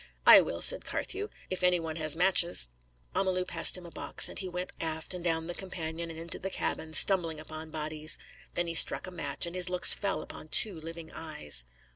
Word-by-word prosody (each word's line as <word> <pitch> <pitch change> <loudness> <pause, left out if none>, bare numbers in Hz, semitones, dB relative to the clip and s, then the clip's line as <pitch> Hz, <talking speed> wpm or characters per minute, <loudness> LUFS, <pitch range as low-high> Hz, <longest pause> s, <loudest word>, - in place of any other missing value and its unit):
"I - - +9
will," - - -5
said - - +6
Carthew, 410 +3 -4 0.2
"if 185 - -4
any 180 -1 +2
one 160 -1 -6
has 155 -2 +1
matches." 175 - +3 0.4
Amalu 185 -1 -1
passed 165 +1 +1
him 180 - -12
a 170 - -12
box, - - -1
and - - -8
he 190 - -5
went 180 +1 -6
aft 160 +1 -4
and 180 -1 -8
down 165 -2 -1
the 175 - -6
companion 170 -3 -6
and 160 - -9
into 165 +1 -6
the 190 - -5
cabin, 160 -4 -4
stumbling 165 -4 +4
upon 155 +1 -9
bodies. 155 0 -2 0.4
Then 175 - -1
he 170 - -5
struck - - +4
a 185 - -9
match, 175 0 +1
and 170 +1 -8
his 180 0 0
looks 180 0 +7
fell 200 -1 -2
upon - - -10
two 185 +1 +3
living 165 0 -10
eyes. 150 - -1
170 Hz, 210 wpm, -29 LUFS, 160-180 Hz, 0.4 s, I